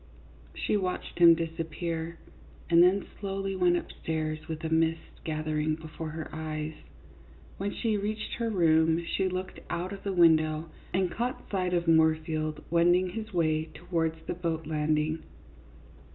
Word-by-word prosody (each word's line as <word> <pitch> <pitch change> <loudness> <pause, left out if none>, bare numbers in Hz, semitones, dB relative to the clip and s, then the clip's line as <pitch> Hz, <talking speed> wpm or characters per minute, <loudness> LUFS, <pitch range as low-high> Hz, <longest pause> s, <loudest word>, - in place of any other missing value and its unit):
She - - 0
watched 185 -2 -3
him 170 -1 +9
disappear, 165 0 -3 0.5
and 170 0 +7
then 185 +3 +4
slowly 195 -1 -2
went 180 -1 +3
up - - -5
stairs, 155 -1 -3
with 160 -1 -5
a 160 - -1
mist 160 0 0
gathering 155 0 -1
before 160 0 -7
her 160 0 -5
eyes. 155 0 -4 0.9
When 200 +1 -1
she 220 -1 0
reached 215 +1 -3
her 230 -1 0
room 165 -3 +3
she 190 +2 0
looked 185 +1 -4
out 180 +3 -2
of 195 - -8
the 200 - -2
window 160 -2 +4 0.2
and 185 -1 +1
caught 245 +6 -3
sight 180 -2 0
of 170 -1 0
Moorfield 155 -1 +2
wending 175 +2 +4
his 220 +4 -6
way 155 -3 +1
towards 165 -2 -1
the - - -2
boat 165 -2 -2
landing. 155 +1 0
165 Hz, 150 wpm, -29 LUFS, 155-185 Hz, 0.9 s, him